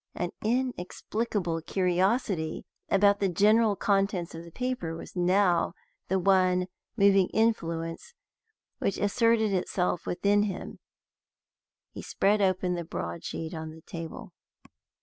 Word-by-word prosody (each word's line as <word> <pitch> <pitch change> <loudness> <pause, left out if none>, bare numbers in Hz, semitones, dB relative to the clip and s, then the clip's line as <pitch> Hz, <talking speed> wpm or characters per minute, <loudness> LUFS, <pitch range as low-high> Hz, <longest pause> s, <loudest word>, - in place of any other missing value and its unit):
An 175 - -2
inexplicable 215 -6 -2
curiosity 185 -1 0 0.2
about 200 +1 +4
the 195 - +1
general 210 +4 +4
contents 195 -3 0
of 165 0 -7
the 170 - -11
paper 250 -6 -3
was 165 - -10
now 180 -1 +2 0.3
the 190 - +1
one 185 -1 +3 0.3
moving 195 -2 +5
influence 170 - -1 0.6
which 195 - -1
asserted 220 0 +2
itself 180 -1 -1
within 205 +3 +2
him, 205 -3 -4 1.1
he - - -8
spread 205 +2 +1
open 185 -2 +1
the 175 -1 -3
broad 85 - -5
sheet 165 +1 -5
on 160 -1 -5
the 160 - -14
table. 165 0 -8
190 Hz, 120 wpm, -28 LUFS, 170-205 Hz, 1.1 s, moving